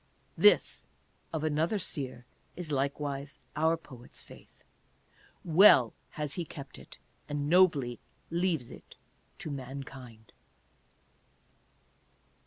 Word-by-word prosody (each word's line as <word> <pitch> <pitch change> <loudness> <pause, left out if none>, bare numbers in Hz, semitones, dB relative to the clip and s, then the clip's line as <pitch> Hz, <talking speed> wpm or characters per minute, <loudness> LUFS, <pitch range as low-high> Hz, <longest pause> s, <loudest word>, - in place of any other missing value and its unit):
This 420 - +4 0.4
of 160 -2 -3
another 155 +6 +1
seer 130 -8 -3 0.3
is 175 -4 -5
likewise 140 0 -2 0.2
our 160 +2 +2
poet's 130 -6 -13
faith. - - -17 0.8
Well 160 - +7 0.2
has 150 -2 -1
he 175 - -2
kept 140 -3 -10
it, - - -13 0.3
and 145 -1 -2
nobly 150 -8 +4 0.3
leaves 170 -7 0
it - - -13 0.4
to 155 - -6
mankind. 130 -4 -9
145 Hz, 95 wpm, -30 LUFS, 135-165 Hz, 0.8 s, Well